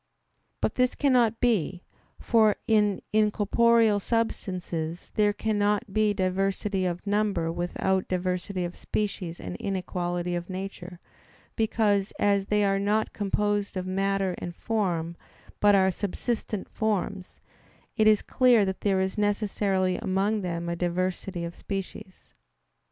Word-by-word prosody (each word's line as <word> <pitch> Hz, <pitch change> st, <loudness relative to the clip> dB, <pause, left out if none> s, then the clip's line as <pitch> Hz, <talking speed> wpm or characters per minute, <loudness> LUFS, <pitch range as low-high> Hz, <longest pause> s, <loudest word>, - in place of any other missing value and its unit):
But -, -, 0 dB
this 250 Hz, 0 st, +1 dB
cannot 245 Hz, -6 st, +3 dB
be; 190 Hz, -, +1 dB, 0.4 s
for 220 Hz, -3 st, +3 dB
in 210 Hz, -3 st, +2 dB
incorporeal 215 Hz, +1 st, +3 dB
substances 180 Hz, -7 st, -3 dB
there 210 Hz, -1 st, +3 dB
cannot 210 Hz, 0 st, 0 dB
be 215 Hz, 0 st, +3 dB
diversity 195 Hz, 0 st, 0 dB
of 175 Hz, +2 st, -4 dB
number 205 Hz, -5 st, 0 dB
without 185 Hz, +2 st, -1 dB
diversity 185 Hz, 0 st, -2 dB
of 175 Hz, -, -6 dB
species 185 Hz, -5 st, -3 dB
and 90 Hz, -1 st, -6 dB
inequality 180 Hz, -, -2 dB
of 175 Hz, +1 st, -4 dB
nature; 185 Hz, -2 st, -6 dB, 0.6 s
because, 210 Hz, -3 st, +1 dB
as 200 Hz, -1 st, +2 dB
they 210 Hz, 0 st, +2 dB
are 195 Hz, 0 st, +2 dB
not 210 Hz, +2 st, 0 dB
composed 205 Hz, 0 st, -1 dB
of 185 Hz, -, -3 dB
matter 195 Hz, 0 st, 0 dB
and 175 Hz, -1 st, -6 dB
form, 175 Hz, -7 st, -1 dB, 0.4 s
but 205 Hz, -1 st, +5 dB
are 190 Hz, -1 st, +4 dB
subsistent 210 Hz, +2 st, -3 dB
forms, 200 Hz, -3 st, -2 dB, 0.6 s
it 215 Hz, -2 st, +3 dB
is 215 Hz, -1 st, +5 dB
clear 245 Hz, -5 st, +4 dB
that 190 Hz, 0 st, -4 dB
there 195 Hz, -2 st, +2 dB
is 190 Hz, +2 st, -2 dB
necessarily 200 Hz, -3 st, +1 dB
among 200 Hz, +3 st, 0 dB
them 170 Hz, -2 st, -3 dB
a 170 Hz, -, -1 dB
diversity 180 Hz, +1 st, -2 dB
of 170 Hz, -, -6 dB
species. 195 Hz, -1 st, -7 dB
195 Hz, 130 wpm, -27 LUFS, 185-210 Hz, 0.6 s, but